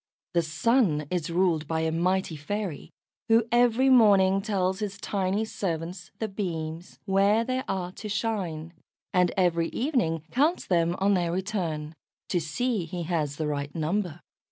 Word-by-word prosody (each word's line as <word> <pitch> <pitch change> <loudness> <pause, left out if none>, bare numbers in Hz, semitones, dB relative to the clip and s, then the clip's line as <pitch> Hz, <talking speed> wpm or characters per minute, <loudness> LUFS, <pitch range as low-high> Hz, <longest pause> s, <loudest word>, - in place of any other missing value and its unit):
The 170 - +3
Sun 160 - +2
is 175 -2 -1
ruled 170 -3 +1
by 160 0 -1
a 160 0 0
mighty 180 +1 0
fairy, 180 +2 -4 0.4
who 225 +1 +5
every 240 +2 +4
morning 200 -6 +5
tells 190 -3 0
his 205 -2 -4
tiny 200 +1 -1
servants, 180 -3 -4
the 220 - -2
beams, 170 -4 -5
where 200 +3 +3
they 255 +2 -1
are 185 -2 -2
to 210 +3 -8
shine, 185 -7 -2 0.4
and 180 -2 +3
every 170 -3 +2
evening 230 - 0
counts 300 +8 +2
them 170 -1 +2
on 200 +1 +3
their 175 -3 +1
return, 170 -5 -3 0.4
to 180 - +1
see 195 +6 -1
he 175 +1 -5
has 155 -4 -1
the 155 - -2
right 145 -1 -3
number. 175 +1 -1
185 Hz, 155 wpm, -27 LUFS, 165-210 Hz, 0.4 s, who